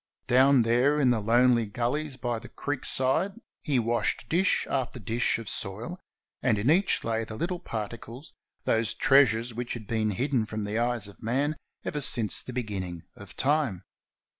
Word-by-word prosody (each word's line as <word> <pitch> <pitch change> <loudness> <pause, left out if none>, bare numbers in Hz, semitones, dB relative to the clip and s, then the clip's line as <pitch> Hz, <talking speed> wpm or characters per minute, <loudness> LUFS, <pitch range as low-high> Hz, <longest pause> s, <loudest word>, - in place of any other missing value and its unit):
Down 130 0 +5
there 125 +6 +3
in 130 -4 +4
the 120 - +1
lonely 120 +1 +3
gullies 130 +6 -2
by 120 -3 -2
the 120 - -12
creek 145 -2 -4
side 145 +10 +3 0.3
he 145 -5 0
washed 120 0 0
dish 185 +4 +2
after 130 -2 -2
dish 115 +3 0
of 115 -2 -8
soil, 110 - -4 0.4
and 115 -4 +2
in 110 +8 +2
each 190 +4 +2
lay 115 0 -1
the 110 - -7
little 175 +8 -3
particles, 115 - -7 0.3
those 115 -1 +1
treasures 120 -4 +3
which 120 +1 -4
had 115 -3 -8
been 110 0 0
hidden 120 +1 0
from 110 -1 -4
the 105 +2 -2
eyes 120 -3 +1
of 100 - -15
man 135 +7 0 0.3
ever 150 - -2
since 115 -5 +2
the - - -8
beginning 95 -8 -4
of - - -12
time. 135 - +1
120 Hz, 170 wpm, -27 LUFS, 110-135 Hz, 0.4 s, Down